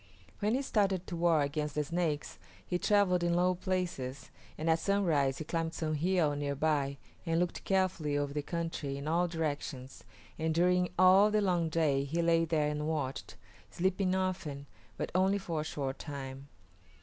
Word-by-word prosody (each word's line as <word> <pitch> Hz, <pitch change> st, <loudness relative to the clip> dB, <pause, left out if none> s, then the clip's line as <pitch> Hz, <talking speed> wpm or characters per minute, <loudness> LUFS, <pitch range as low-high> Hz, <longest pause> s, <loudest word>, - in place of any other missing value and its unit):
When 215 Hz, +3 st, +1 dB
he 275 Hz, -, 0 dB
started 195 Hz, -7 st, +1 dB
to 175 Hz, -, -5 dB
war 165 Hz, -2 st, +3 dB
against 150 Hz, 0 st, -2 dB
the 150 Hz, -, +1 dB
Snakes 160 Hz, -2 st, -2 dB, 0.3 s
he 180 Hz, -, -1 dB
travelled 190 Hz, -4 st, +3 dB
in 170 Hz, 0 st, +2 dB
low 180 Hz, +1 st, +3 dB
places, 180 Hz, -8 st, -3 dB, 0.3 s
and 155 Hz, -, -3 dB
at 165 Hz, 0 st, +3 dB
sunrise 165 Hz, -9 st, +1 dB
he -, -, -4 dB
climbed 165 Hz, +1 st, -2 dB
some 155 Hz, -1 st, -2 dB
hill 160 Hz, -1 st, +1 dB
near 145 Hz, -1 st, -2 dB
by 140 Hz, -2 st, 0 dB, 0.3 s
and 165 Hz, -1 st, 0 dB
looked 180 Hz, 0 st, -2 dB
carefully 185 Hz, -6 st, +1 dB
over 145 Hz, -1 st, -2 dB
the 150 Hz, -, -1 dB
country 165 Hz, -3 st, -3 dB
in 140 Hz, +2 st, -6 dB
all 170 Hz, +3 st, +2 dB
directions, 145 Hz, -5 st, -4 dB, 0.4 s
and 160 Hz, 0 st, 0 dB
during 180 Hz, +1 st, +3 dB
all 185 Hz, +3 st, +7 dB
the 215 Hz, 0 st, +2 dB
long 175 Hz, -5 st, +1 dB
day 150 Hz, -4 st, +2 dB
he 165 Hz, +5 st, -1 dB
lay 165 Hz, 0 st, +3 dB
there 155 Hz, -2 st, +1 dB
and 150 Hz, 0 st, -2 dB
watched, 145 Hz, -4 st, -3 dB, 0.3 s
sleeping 185 Hz, +1 st, 0 dB
often, 180 Hz, -7 st, -2 dB, 0.3 s
but -, -, -3 dB
only 190 Hz, +2 st, +3 dB
for 170 Hz, -5 st, -3 dB
a -, -, -3 dB
short 140 Hz, -3 st, -4 dB
time. 135 Hz, -2 st, -7 dB
165 Hz, 175 wpm, -32 LUFS, 145-180 Hz, 0.4 s, all